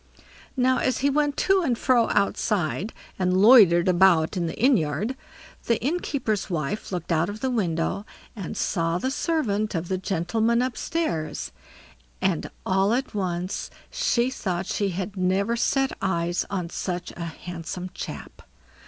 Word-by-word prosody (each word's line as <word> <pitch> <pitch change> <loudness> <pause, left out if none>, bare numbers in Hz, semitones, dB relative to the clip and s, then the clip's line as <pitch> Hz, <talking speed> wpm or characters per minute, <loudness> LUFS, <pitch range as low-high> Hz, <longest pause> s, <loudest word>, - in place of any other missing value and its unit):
Now, 255 0 +3
as 255 -2 0
he 280 - +4
went 290 0 +1
to 385 0 +3
and 255 -9 0
fro 240 -2 +3
outside, 200 -1 0 0.3
and 185 0 +2
loitered 195 -5 +7
about 175 -3 +4
in 175 -2 -1
the - - -6
inn 260 +3 +5
yard, 170 - -1 0.5
the 230 -2 +2
innkeeper's 265 - -1
wife 170 +4 -3
looked 175 -2 -4
out 165 +2 +2
of 210 +4 -7
window 200 -5 -1 0.3
and 195 -6 -6
saw 165 -2 0
the 260 +8 -1
servant 215 - 0
of 165 +1 -3
the 185 -1 -1
gentlemen 220 +7 +1
upstairs; 240 - -2 0.7
and, - - 0 0.2
all 195 +4 +2
at 265 +2 -3
once, 185 -2 -2 0.2
she 245 +1 +1
thought 185 -7 -2
she 200 +1 -1
had 190 +2 -4
never 190 +5 +1
set 270 +3 +1
eyes 175 -2 0
on 180 -4 -3
such 180 -1 -4
a 170 - -5
handsome 175 +2 -6
chap. - - -8
195 Hz, 145 wpm, -25 LUFS, 175-235 Hz, 0.7 s, loitered